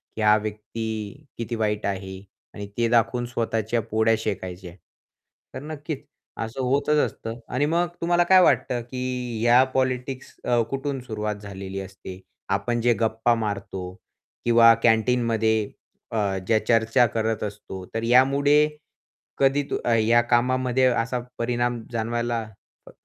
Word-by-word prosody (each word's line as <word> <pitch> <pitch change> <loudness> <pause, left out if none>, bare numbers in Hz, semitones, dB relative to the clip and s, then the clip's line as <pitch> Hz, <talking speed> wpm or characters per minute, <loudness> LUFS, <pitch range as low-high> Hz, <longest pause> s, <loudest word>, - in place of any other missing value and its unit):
की 110 - -4
हा 105 0 +6
व्यक्ती 110 +4 -5
किती 115 0 -3
वाईट 105 -1 -1
आहे 95 -1 -4 0.3
आणि 100 -1 -7
ते 115 -1 +2
दाखवून 120 +1 +2
स्वतःच्या 115 -1 -1
पोळ्या 110 +1 +2
शेकायच्या. 95 -4 -5 0.8
तर - - -6
नक्कीच, 150 -1 -6 0.3
असं 115 +4 -4
होतच 140 +4 +1
असतं 115 +1 -7
आणि 135 +4 +2
मग 170 +3 +1
तुम्हाला 175 +1 +3
काय 185 +1 +6
वाटतं 125 -7 +2
की, 125 -1 -4
ह्या 120 +2 +6
पॉलिटिक्स 130 0 -2
अ, 120 -1 +2
कुठून 135 0 -3
सुरुवात 105 -3 -3
झालेली 95 -1 -7
असते? 95 -1 -9 0.3
आपण 120 -1 0
जे 120 0 +4
गप्पा 115 +1 +2
मारतो 100 -4 -4 0.5
किंवा 115 -1 +7
कॅन्टीनमध्ये 110 -2 +2 0.4
अ, 100 -3 0
ज्या 110 -1 +4
चर्चा 115 +2 +4
करत 110 0 -2
असतो, 100 -3 -7
तर 115 0 -2
यामुळे 135 +4 +4 0.8
कधी 140 +1 +3
तो - - -1
अ, 120 - +2
या 115 +2 +4
कामामध्ये 125 +2 +2 0.2
असा 125 +1 -3 0.2
परिणाम 120 0 -1
जाणवायला 115 0 -1 0.5
अ, - - -12
115 Hz, 135 wpm, -24 LUFS, 110-125 Hz, 0.8 s, किंवा